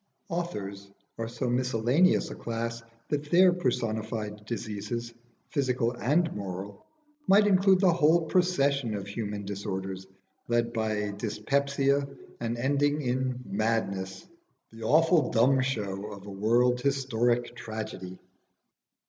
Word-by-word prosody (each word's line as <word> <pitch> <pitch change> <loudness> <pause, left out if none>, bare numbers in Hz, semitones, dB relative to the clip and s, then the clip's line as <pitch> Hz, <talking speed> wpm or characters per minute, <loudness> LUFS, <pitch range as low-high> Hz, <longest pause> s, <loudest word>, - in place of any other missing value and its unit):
Authors 100 - -4 0.3
are 115 - -2
so 120 +2 -3
miscellaneous 125 +7 +2
a - - -6
class 115 0 -4 0.3
that 145 0 -2
their 180 +2 +6
personified 110 -7 -2
diseases, 115 +1 -4 0.4
physical 125 -5 +1
and 150 +7 +1
moral, 100 0 -6 0.4
might 205 +2 +6
include 190 -1 +5
the 185 -3 +5
whole 165 +1 +4
procession 140 - +1
of 100 -2 -4
human 100 0 -4
disorders, 95 -1 -4 0.4
led 120 0 +1
by 110 -2 -1
dyspepsia 140 +7 0 0.3
and 115 0 -2
ending 145 +4 +1
in 125 0 -1
madness 100 -3 -2 0.4
the 115 0 -12
awful 160 +7 +4
Dumb 130 +3 +4
Show 105 -6 -2
of 100 -1 -10
a 100 - -8
world 120 +5 +2
historic 120 -3 0
tragedy. 110 -5 -6
120 Hz, 115 wpm, -28 LUFS, 105-140 Hz, 0.4 s, their